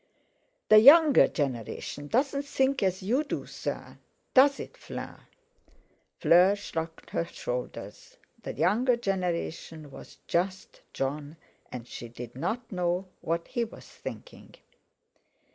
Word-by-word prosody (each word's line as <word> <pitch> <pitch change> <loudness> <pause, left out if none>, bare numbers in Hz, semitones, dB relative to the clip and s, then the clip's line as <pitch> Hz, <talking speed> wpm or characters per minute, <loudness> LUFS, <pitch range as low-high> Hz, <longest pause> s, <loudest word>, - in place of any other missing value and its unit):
"The 215 - +9
younger 290 +4 +8
generation 140 +1 -4
doesn't 280 - 0
think 270 0 +1
as 190 -1 0
you 250 +10 +1
do, 290 - -4
sir; - - -6 0.3
does 275 +1 +6
it, - - -8
Fleur?" - - -9 0.9
Fleur 180 +4 +6
shrugged 165 -5 -6
her 170 - 0
shoulders—the 125 -6 -7
younger 240 +7 +2
generation 170 -7 -3
was - - -12
just 185 +2 -2
Jon, 145 +3 -4 0.3
and 125 -1 -7
she 120 - -8
did 120 0 -9
not 230 - -3
know 180 0 -1
what 170 +1 -2
he 240 - 0
was 225 - -9
thinking. - - -10
185 Hz, 115 wpm, -28 LUFS, 155-245 Hz, 0.9 s, The